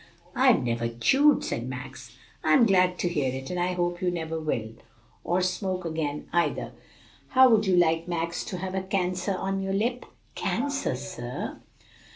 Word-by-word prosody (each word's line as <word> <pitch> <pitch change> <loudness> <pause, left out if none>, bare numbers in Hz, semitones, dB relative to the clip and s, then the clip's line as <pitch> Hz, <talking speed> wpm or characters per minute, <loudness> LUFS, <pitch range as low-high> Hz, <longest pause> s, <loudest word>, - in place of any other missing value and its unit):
"I've - - +4
never 115 -1 -1
chewed," 265 - +3
said - - -3
Max. - - -9 0.3
"I'm 255 -4 +5
glad 180 -3 +3
to - - -1
hear 145 -7 0
it, 130 +3 -6
and 180 - -2
I 180 +1 0
hope 175 0 -1
you 180 - +1
never 165 -2 -3
will, 120 -8 -2 0.5
or 175 +2 +1
smoke 185 0 -2
again 155 -3 -3
either. 175 0 0 0.6
How 260 -1 +6
would 215 -2 +4
you 185 - +4
like, 165 -1 +3
Max, 170 0 -2
to 185 - -5
have 185 +1 -4
a 190 - -1
cancer 185 0 -1
on 195 +1 -2
your 195 0 -2
lip?" 240 +5 -1 0.3
"Cancer, 275 - -1
sir? 120 -1 -6
180 Hz, 170 wpm, -27 LUFS, 160-195 Hz, 0.6 s, How